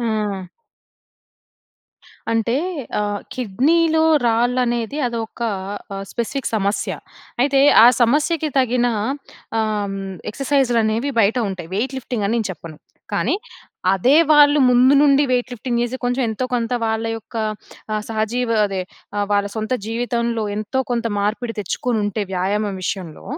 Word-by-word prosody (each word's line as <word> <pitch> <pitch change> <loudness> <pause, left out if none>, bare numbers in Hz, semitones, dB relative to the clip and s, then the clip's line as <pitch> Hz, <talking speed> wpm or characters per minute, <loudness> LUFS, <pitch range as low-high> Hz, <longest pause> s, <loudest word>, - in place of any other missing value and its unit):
ఆ! 210 -5 -2 1.9
అంటే 230 +2 +1 0.4
ఆ! - - +1 0.3
కిడ్నీలో 315 - +2 0.2
రాళ్ళనేది 240 +2 +1
అదొక 230 0 -5 0.5
ఆహ్, 195 0 -5
స్పెసిఫిక్ 250 +3 -2
సమస్య. 200 -1 0 0.5
అయితే 275 0 +3 0.2
ఆ - - +9
సమస్యకి 305 +6 +2
తగిన 250 -1 +2 0.7
ఆహ్, 210 -2 -1 0.3
ఎక్సర్సైజ్‌లనేవి 245 -2 +1
బయట 210 +3 +3
ఉంటాయి. 175 -4 -7
వెయిట్ 260 +5 -1
లిఫ్టింగ్ 240 -4 -3
అని 220 - 0
నేను 225 -3 -1
చెప్పను. 160 -2 -11 0.3
కానీ 215 - +1 0.6
అదే 250 - +4
వాళ్ళు 295 0 +6
ముందు 250 +3 +5
నుండి 280 -1 +5
వెయిట్ 250 0 +1
లిఫ్టింగ్ 240 0 -2
చేసి, 240 +2 -2
కొంచెం 245 +2 0
ఎంతో 220 +4 -2
కొంత 235 0 -1
వాళ్ళ 220 0 -1
యొక్క 225 +1 -10 0.6
ఆహ్, 215 0 -1
సహజీవ 225 +1 0
అదే 195 -2 -3 0.4
ఆహ్, 205 0 0
వాళ్ళ 200 0 +2
సొంత 220 +3 -2
జీవితంలో 235 0 -1
ఎంతో 215 +5 -1
కొంత 235 -1 -1
మార్పిడి 225 +3 -1
తెచ్చుకోనుంటే 210 +1 -1
వ్యాయామం 195 +2 -1
విషయంలో. 175 -4 -5
230 Hz, 125 wpm, -20 LUFS, 210-250 Hz, 1.9 s, ఆ